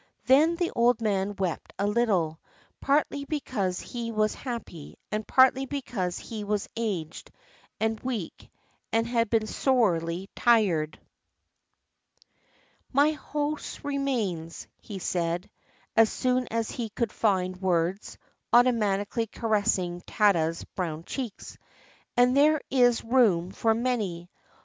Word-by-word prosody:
Then 300 +6 +5
the 345 0 -1
old 240 0 +3
man 205 -2 0
wept 185 -4 -3
a 200 - 0
little, 200 -8 +1 0.4
partly 285 0 +1
because 230 - -2
he 235 -1 -5
was 215 -1 +1
happy, 230 - -7
and 215 0 -3
partly 260 +1 +4
because 235 -10 -3
he 220 -3 -6
was 205 0 -1
aged 190 -8 -4 0.5
and 220 0 0
weak 235 -10 -5 0.4
and 225 0 +2
had 230 -2 0
been 225 -1 +2
sorely 190 -8 +1
tried. 190 -10 +2 1.9
"My 285 +3 +4
house 300 0 -4
remains," 235 - -2
he 205 - -8
said, 175 -1 -2 0.5
as 225 -1 +5
soon 255 0 0
as 230 -1 -2
he 235 -3 -4
could 225 +1 -2
find 185 -4 +1
words, 180 +1 -1 0.3
automatically 225 -2 +2
caressing 205 -6 0
Tada's 170 -7 +1
brown 165 -4 -5
cheeks; 240 0 -6 0.6
"and 250 +1 +5
there 300 +2 +5
is 245 -3 +4
room 215 -8 +3
for 225 +2 +1
many. 210 -8 -2
220 Hz, 115 wpm, -27 LUFS, 185-250 Hz, 1.9 s, Then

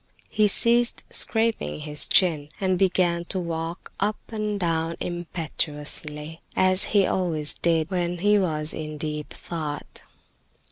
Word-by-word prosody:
He 215 -1 +3
ceased 235 +4 +3
scraping 220 - +2
his 150 -1 0
chin, 155 -6 +3
and 185 -2 0
began 180 -3 +2
to 185 - -1
walk 165 0 -5
up 210 +2 0
and 215 -2 -3
down 165 -2 -1
impetuously, 155 -2 -3
as 185 0 +5
he 200 -2 +3
always 160 -6 +2
did 165 0 0
when 175 -1 -1
he 205 +3 +3
was 155 -4 -1
in 155 -1 -6
deep 150 -1 -5
thought. 155 -4 -6
170 Hz, 130 wpm, -24 LUFS, 155-190 Hz, -, as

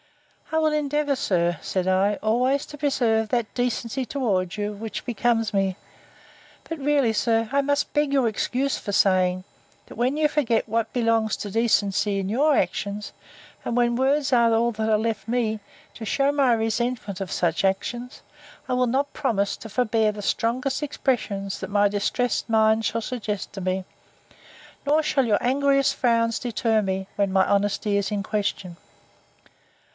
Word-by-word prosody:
I 320 - +1
will 310 -1 +2
endeavour, 295 -1 0
sir, 175 -8 0
said 185 -1 -2
I, 190 +2 +2
always 250 +7 +1
to 295 - -11
preserve 235 -7 +1
that 235 -2 -1
decency 245 +1 -1
towards 205 -9 -1
you 210 0 -2
which 215 +2 -6
becomes 230 -2 0
me. 195 -1 0 0.9
But 325 -1 -5
really, 280 -5 +2
sir, 225 0 +1
I 280 - +4
must 285 +1 -1
beg 295 -1 +1
your 270 -4 +3
excuse 255 +5 -1
for 205 - -5
saying, 185 -2 +2 0.4
That - - -13
when 250 +5 0
you 310 -1 +3
forget 250 -8 0
what 225 0 -1
belongs 230 -2 +1
to 205 - -6
decency 205 -2 +1
in 190 - -3
your 285 +7 +3
actions, 200 +3 -2 0.5
and 240 - -2
when 240 -1 +2
words 270 +2 +1
are 235 -1 +4
all 235 +1 +2
that 220 0 -2
are 215 - +4
left 220 0 -2
me, 225 -2 0 0.3
to 230 - -9
shew 275 +6 +1
my 275 -3 +3
resentment 225 -3 -2
of 190 - -4
such 170 0 0
actions, 240 +6 -2 0.4
I 255 - -1
will 250 0 +2
not 275 +4 0
promise 200 -3 0
to 225 - -10
forbear 220 -1 +1
the 205 -1 -8
strongest 255 +7 -1
expressions 225 -9 -2
that 190 - -6
my 205 0 +3
distressed 210 +5 -1
mind 220 0 +3
shall 230 - -1
suggest 215 -3 -4
to 195 - -6
me: 185 0 -2 1.0
nor 300 +2 +3
shall 270 -3 +1
your 210 -3 +2
angriest 275 +1 +2
frowns 230 -2 +1
deter 225 -2 0
me, 190 -1 -2
when 200 -1 0
my 190 0 +3
honesty 200 0 +1
is 200 +1 -1
in 205 -1 -1
question. 200 -4 -3
225 Hz, 165 wpm, -24 LUFS, 205-255 Hz, 1.0 s, I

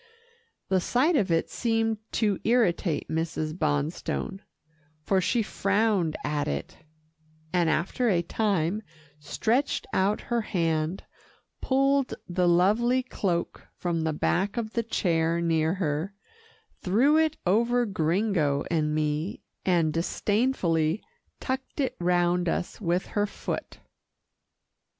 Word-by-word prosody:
The 190 -1 +3
sight 265 - +2
of 200 -9 +2
it 165 0 +1
seemed 225 -2 0
to 210 -4 +1
irritate 195 -9 +1
Mrs. 160 -1 -2
Bonstone, 155 +4 -2 0.6
for 190 +4 +2
she 230 +5 +1
frowned 200 -5 +1
at 150 0 -1
it, 70 0 -4 0.8
and 175 -2 +3
after 195 +10 0
a 175 -4 +2
time, 200 -1 0 0.4
stretched 235 - 0
out 200 +3 +1
her 240 -1 -1
hand, 165 -3 -1 0.6
pulled 275 0 +2
the 180 0 +1
lovely 215 +9 +3
cloak 185 -8 -3
from 170 -2 -1
the 160 0 0
back 190 +7 0
of 225 -1 -3
the 235 - +1
chair 170 -6 0
near 165 0 +1
her, 170 +1 -2 0.7
threw 250 +11 +3
it 315 -1 +2
over 235 +6 +3
Gringo 165 -5 +1
and 155 -2 +1
me, 155 +4 -2 0.2
and 170 -4 +3
disdainfully 175 -2 0 0.4
tucked 260 +2 -4
it 270 - 0
round 175 0 +2
us 180 - -3
with 180 0 0
her 205 0 +1
foot. - - -5
185 Hz, 120 wpm, -27 LUFS, 165-225 Hz, 0.8 s, The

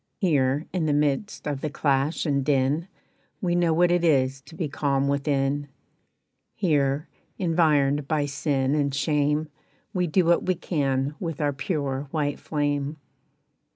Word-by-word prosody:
"Here, 145 -5 +1
in 170 -4 0
the 150 - +2
midst 150 +7 0
of 145 -2 -2
the 155 - -2
clash 140 +2 0
and 140 -3 +1
din, 140 +4 +1 0.5
We 175 -2 0
know 175 -1 +2
what 175 +2 +3
it 175 0 +2
is 135 -4 +2
to 165 - -12
be 160 -2 -2
calm 140 -1 0
within. 140 0 0 0.9
"Here, 145 -5 +1 0.3
environed 150 -5 +2
by 150 -2 +1
sin 140 -1 0
and 140 -2 0
shame, 150 +1 +1 0.5
We 180 -1 +1
do 175 +3 +2
what 170 +1 +3
we 185 - +2
can 140 -4 -1
with 165 -6 -4
our 145 -2 +1
pure 140 -2 -2
white 145 -2 -1
flame. 145 0 -1
145 Hz, 150 wpm, -25 LUFS, 140-160 Hz, 0.9 s, what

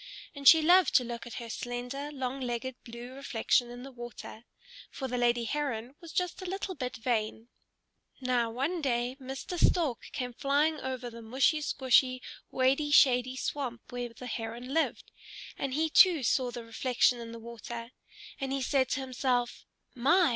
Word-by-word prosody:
And 280 -1 -2
she 320 -1 +9
loved 355 -1 +5
to 250 - +6
look 235 0 -6
at 240 - -8
her 235 - -6
slender, 245 +5 -5
long 265 -1 -3
legged 245 +1 -3
blue 235 +2 -9
reflection 245 -2 +1
in 245 +1 -8
the 270 - -9
water; 240 -2 -9 0.4
for 265 - -5
the 250 - -3
lady 240 -1 +2
Heron 255 -2 -2
was 335 -2 -10
just 360 +2 -1
a 370 - -5
little 390 0 -3
bit 250 -5 -4
vain. 225 -1 -2 0.7
Now 250 -3 +1
one 280 +9 -2
day 245 -2 0
Mr. 270 +7 -4
Stork 305 -10 +2
came 250 -3 -4
flying 290 +5 +1
over 255 -2 -4
the 230 0 -10
mushy 260 +7 +2
squshy, 260 -3 +3 0.3
wady 270 +3 +2
shady 255 -3 +5
swamp 260 -3 -4
where 245 -1 -4
the 230 +2 -11
Heron 235 +2 -5
lived, 325 +1 0 0.4
and 270 -1 -3
he 320 +2 +2
too 330 -2 +6
saw 250 +2 +2
the 240 -1 -7
reflection 245 +1 +2
in 230 -1 -7
the 230 - -7
water. 235 +1 -8 0.5
And 270 -1 -3
he 270 -1 -1
said 265 -1 +2
to 270 - -1
himself, 250 -2 -1 0.3
"My! 315 +8 +4
255 Hz, 170 wpm, -30 LUFS, 240-280 Hz, 0.7 s, she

